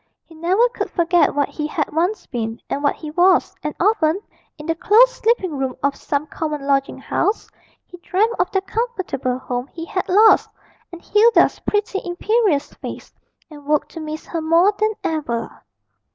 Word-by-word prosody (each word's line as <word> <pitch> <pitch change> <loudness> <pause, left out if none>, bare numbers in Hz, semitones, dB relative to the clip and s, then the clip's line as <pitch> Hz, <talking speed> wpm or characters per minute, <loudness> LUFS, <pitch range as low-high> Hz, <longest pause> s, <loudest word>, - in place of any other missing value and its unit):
He 330 - -17
never 365 +9 +2
could - - -4
forget 345 -2 +2
what 285 -1 +1
he 300 -1 -4
had 305 -1 -3
once 355 +7 0
been, 225 -2 -4
and 280 - -1
what 285 - +1
he 305 -2 -8
was, 360 +3 +3
and 300 0 -4
often, 345 -3 +2 0.4
in 300 - -10
the 330 - 0
close 445 +9 +5
sleeping 425 -10 0
room 265 -2 -2
of 280 0 +1
some 285 +1 -2
common 305 -2 -4
lodging 275 -1 0
house, 420 - -1 0.4
he 355 - -14
dreamed 405 +6 0
of - - +2
the 385 - 0
comfortable 380 - -3
home 250 0 -4
he 330 +2 -8
had 370 +1 -3
lost, 425 +4 +5 0.4
and 345 -1 -11
Hilda's 445 +3 +4
pretty 415 -1 -1
imperious 365 -2 0
face, - - -9 0.4
and 295 -1 -12
woke 300 -1 +1
to 330 - -9
miss 310 0 -6
her 330 - -4
more 335 +6 +4
than 435 0 +2
ever. 240 -8 -3
330 Hz, 175 wpm, -20 LUFS, 295-395 Hz, 0.4 s, close